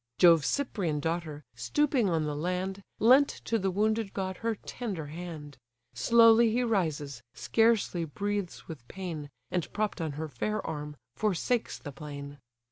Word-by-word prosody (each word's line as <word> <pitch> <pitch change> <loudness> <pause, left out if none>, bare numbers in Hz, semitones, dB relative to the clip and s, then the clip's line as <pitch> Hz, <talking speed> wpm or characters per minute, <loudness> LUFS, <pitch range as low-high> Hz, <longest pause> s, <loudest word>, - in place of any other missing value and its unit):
Jove's 165 -4 +6
Cyprian 195 - -1
daughter, 160 -1 -3
stooping 240 - +1
on 165 -2 +1
the 150 -1 -2
land, 180 +5 -2 0.2
Lent 260 +6 +6 0.2
to 230 - +1
the 190 -1 0
wounded 215 +2 0
god 190 -1 -2
her 230 -1 -1
tender 200 -7 -5
hand: 155 -2 -8 0.3
Slowly 230 0 +6
he 245 +3 +1
rises, 155 - -1
scarcely 225 -7 +2
breathes 200 +4 -3
with 145 -8 -9
pain, 170 -6 -6 0.2
And, 180 -3 -2
propp'd 210 -3 -1
on 160 -3 -2
her 155 +2 -4
fair 210 - -3
arm, 150 -1 -5 0.2
forsakes 215 +3 0
the 145 - -8
plain. 145 0 -8
180 Hz, 145 wpm, -29 LUFS, 150-215 Hz, 0.3 s, Jove's